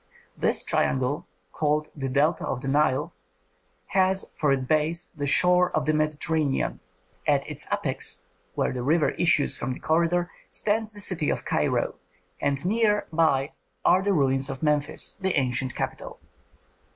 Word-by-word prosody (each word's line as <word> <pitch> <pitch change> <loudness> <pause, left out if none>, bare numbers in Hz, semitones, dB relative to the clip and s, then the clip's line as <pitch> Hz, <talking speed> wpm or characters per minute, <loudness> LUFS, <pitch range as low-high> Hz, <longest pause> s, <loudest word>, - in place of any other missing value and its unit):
This - - +1
triangle, 130 +2 0 0.2
called 150 +3 0
the 135 -3 -3
Delta 145 +5 +1
of 125 - -3
the 135 - -5
Nile, 135 -1 +1 0.8
has 190 0 +2
for 150 -2 +1
its 135 -1 +1
base 155 +4 0
the 145 -2 -3
shore 180 +4 +4
of 155 -1 0
the 155 - +2
Mediterranean; 155 - 0 0.5
at - - +2
its - - -6
apex, - - -2 0.3
where - - 0
the 125 - -4
river 150 +5 +2
issues 165 -4 +2
from 130 +1 -2
the - - -9
corridor, 170 +2 +1 0.2
stands 215 +1 +1
the 205 - -10
city 180 -7 +1
of - - -2
Cairo, - - 0 0.5
and 140 +3 0
near 210 +1 +2
by 150 -4 +2 0.3
are 185 - +5
the 200 +1 +1
ruins 135 -5 +1
of 135 +2 -6
Memphis, 150 0 +1
the 190 -1 0
ancient 130 -1 -1
capital. - - -5
150 Hz, 150 wpm, -26 LUFS, 135-175 Hz, 0.8 s, are